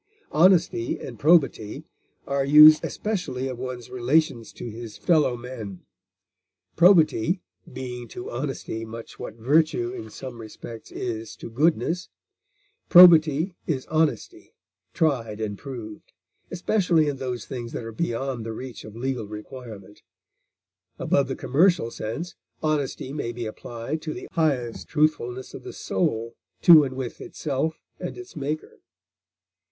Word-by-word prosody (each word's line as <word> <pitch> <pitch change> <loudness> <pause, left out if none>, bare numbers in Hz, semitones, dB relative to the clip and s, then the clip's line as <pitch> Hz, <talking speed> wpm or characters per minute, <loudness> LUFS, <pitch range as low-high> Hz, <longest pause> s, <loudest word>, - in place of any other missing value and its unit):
Honesty 165 -8 +3
and 120 -4 -8
probity 145 -9 +3 0.4
are 140 0 0
used 150 +2 +8
especially 155 -12 -3
of 125 -2 -6
one's 125 -1 -6
relations 125 -1 +1
to - - -7
his 115 -1 -8
fellow 150 -8 +2
men, 115 -6 -8 0.9
probity 175 - +4 0.3
being 125 -2 -6
to 120 - -8
honesty 120 -3 -4
much 115 +1 -9
what 110 - -7
virtue 155 - +2
in 360 -3 -7
some 125 -3 -8
respects 110 +1 -10
is 115 -2 -5
to - - -9
goodness; 165 +6 +1 0.8
probity 165 -1 +7
is 135 -5 -1
honesty 160 - -1 0.4
tried 120 - 0
and 105 -2 -4
proved, 115 -6 -9 0.4
especially 175 -4 +2
in 145 -2 -2
those 125 -2 -4
things 120 -3 -6
that - - -5
are 115 - -6
beyond 125 -2 -2
the 115 0 -5
reach 125 0 -8
of 110 0 -11
legal 125 -2 -3
requirement; 105 -2 -10 1.0
above 140 -1 +1
the 135 - -3
commercial 160 -4 +2
sense, 150 +13 -5 0.3
honesty 145 -3 -1
may 130 -6 -3
be 120 0 -5
applied 115 +7 -5
to 155 -1 -5
the - - -8
highest 135 -8 -1
truthfulness 140 -5 0
of - - -8
the - - -8
soul 110 +4 -1 0.3
to 165 -4 +9
and 130 -2 -4
with 130 -2 -5
itself 155 +2 -3 0.2
and - - -5
its 370 - -11
Maker. 150 +1 -4
130 Hz, 135 wpm, -25 LUFS, 115-155 Hz, 1.0 s, to